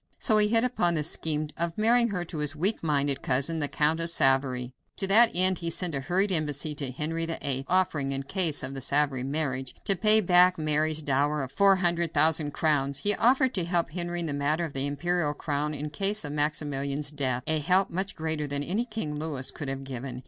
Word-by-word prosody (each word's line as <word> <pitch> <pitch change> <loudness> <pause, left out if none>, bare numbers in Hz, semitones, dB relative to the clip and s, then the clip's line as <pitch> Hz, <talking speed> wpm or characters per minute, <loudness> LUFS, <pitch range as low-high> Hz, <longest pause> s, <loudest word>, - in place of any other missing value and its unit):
So 215 -4 +2
he 210 - +4
hit 225 +2 +2
upon 180 -9 0
the 155 - -1
scheme 155 -1 +1
of 170 0 -3
marrying 235 +2 +3
her 190 -5 -3
to 160 -2 -7
his 150 0 +2
weak 190 +8 +1
minded 145 -3 -1
cousin, 140 +6 0
the 145 - -1
Count 155 +3 +1
of 165 0 +1
Savoy. 135 -4 +1 0.3
To 195 - +1
that 220 +4 +6
end 185 0 +4
he 170 - -3
sent 175 0 -2
a 140 - -2
hurried 185 +9 0
embassy 150 -2 -1
to 145 -2 -3
Henry 165 +5 -3
VIII, 140 -5 -3
offering, 175 -7 0
in 135 0 -3
case 160 -1 0
of 130 +1 -5
the 135 - -7
Savoy 140 -1 +1
marriage, 135 -2 -3
to 195 - +3
pay 215 +3 +6
back 180 -1 +4
Mary's 155 0 -1
dower 145 +1 0
of 130 - -7
four 195 +4 +4
hundred 170 -2 -1
thousand 155 0 +3
crowns. 140 -3 0
He 205 - +3
offered 260 +4 +2
to 185 - -1
help 170 -1 -1
Henry 175 0 -3
in - - -3
the 150 - -3
matter 150 +4 -1
of 155 - -8
the 135 +1 -2
imperial 155 +1 -1
crown 150 0 -3
in 150 +1 -5
case 200 0 0
of 145 - -5
Maximilian's 145 -1 -2
death 130 -4 -2
a 155 0 0
help 185 +5 +1
much 190 +3 -3
greater 155 -2 -3
than 140 0 -3
any 205 +10 -2
King 165 -11 -5
Louis 150 -5 -2
could 145 - -7
have 135 0 -5
given. 130 -1 -7
155 Hz, 220 wpm, -27 LUFS, 140-180 Hz, 0.3 s, that